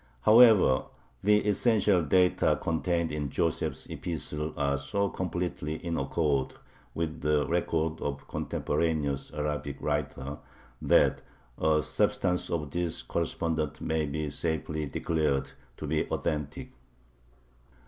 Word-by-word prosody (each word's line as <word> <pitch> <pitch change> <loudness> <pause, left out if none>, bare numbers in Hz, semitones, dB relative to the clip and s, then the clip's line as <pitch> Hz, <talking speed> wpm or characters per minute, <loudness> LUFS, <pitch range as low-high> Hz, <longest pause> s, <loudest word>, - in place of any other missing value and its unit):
However, 110 - +6 0.4
the 105 +1 +4
essential 105 -3 +3
data 90 +4 +3
contained 85 0 0
in 75 -2 -2
Joseph's 80 +3 -1
epistle 75 -2 -4
are 70 0 +1
so 100 +9 -1
completely 90 -4 -3
in 85 +1 -4
accord 70 -1 0 0.4
with 80 -1 -3
the 75 -1 +2
reports 80 -2 -1
of 70 -1 -4
contemporaneous 75 -3 -1
Arabic 75 -2 -3
writers 75 -1 -3 0.4
that - - +4 0.3
the 80 -1 +2
substance 90 +1 0
of 75 -4 -2
this 85 0 -2
correspondence 80 -3 -2
may 80 -1 -1
be 75 +1 -3
safely 80 -1 -2
declared 70 -2 -1 0.3
to - - -5
be 75 +1 -1
authentic. 75 -2 -3
80 Hz, 110 wpm, -29 LUFS, 75-85 Hz, 0.4 s, However